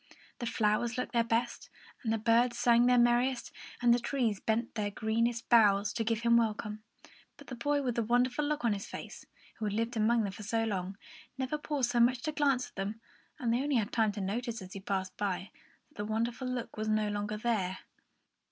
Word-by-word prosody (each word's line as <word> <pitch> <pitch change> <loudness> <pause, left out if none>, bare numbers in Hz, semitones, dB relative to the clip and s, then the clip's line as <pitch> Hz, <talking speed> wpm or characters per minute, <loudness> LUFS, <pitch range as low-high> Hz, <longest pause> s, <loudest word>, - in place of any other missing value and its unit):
The 240 - -3
flowers 225 +2 +1
looked 250 - -2
their 235 -1 +3
best, 230 +1 -1 0.3
and 225 - -1
the 225 - +2
birds 235 +2 +3
sang 240 0 +4
their 250 0 +5
merriest, 240 +1 +2 0.3
and 240 -1 +6
the 240 - +3
trees 235 -5 -1
bent 230 +2 -1
their 210 -2 -1
greenest 230 +3 -1
boughs, 205 -3 +4
to 230 - -1
give 225 0 0
him 235 0 +5
a - - +5
welcome; 215 -1 -3 0.6
but - - -13
the 255 - -7
boy 285 +4 0
with 250 -2 0
the 235 - 0
wonderful 245 +5 +1
look 295 -4 -1
on 225 - +3
his 200 -1 -5
face, - - -9 0.3
who 220 - -2
had 205 - -1
lived 230 +2 -1
among 225 +1 +3
them 200 - -2
for 205 - -9
so 225 +2 0
long, 195 -3 -3 0.4
never 265 +3 -2
paused 280 -5 -1
so 240 - +1
much 240 +2 +5
as 245 - -15
to 310 - -1
glance 275 -4 +1
at - - -32
them, 200 +3 -3 0.4
and 240 -6 0
they 240 - +1
only 285 0 0
had 215 -4 +1
time 220 -2 +2
to 200 - -5
notice, 230 +4 -3
as 185 -2 -10
he 195 - -6
passed 190 -1 -3
them 205 - +1
by, 185 +1 -5 0.4
that - - -26
the 205 - -3
wonderful 230 +4 -2
look 250 -3 -4
was 215 0 -2
no 215 0 +2
longer 205 +1 -2
there. 210 -5 -1
230 Hz, 225 wpm, -31 LUFS, 210-245 Hz, 0.6 s, and